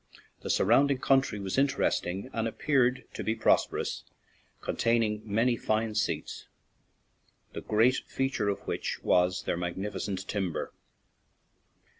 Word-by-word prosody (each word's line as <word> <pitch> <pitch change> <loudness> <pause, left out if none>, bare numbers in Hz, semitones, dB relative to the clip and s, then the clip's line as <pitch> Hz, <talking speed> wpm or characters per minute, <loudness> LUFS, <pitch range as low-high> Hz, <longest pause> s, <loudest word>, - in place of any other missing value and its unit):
The - - -6
surrounding 135 +6 +4
country 135 -5 +2
was 100 +5 -1
interesting 125 -5 0
and 115 0 -1
appeared 130 +1 +1
to - - -5
be 110 - 0
prosperous, 110 - +1 0.6
contain 115 0 +1
ing 105 -1 -2
many 115 +4 +2
fine 110 0 -1
seats, 105 - -2 1.1
the - - -5
great 115 +5 +3
feature 135 -6 -1
of 100 - -2
which - - -4
was 90 0 +2
their - - -1
magnificent 95 +2 -4
timber. 95 -5 -3
110 Hz, 120 wpm, -29 LUFS, 100-125 Hz, 1.1 s, surrounding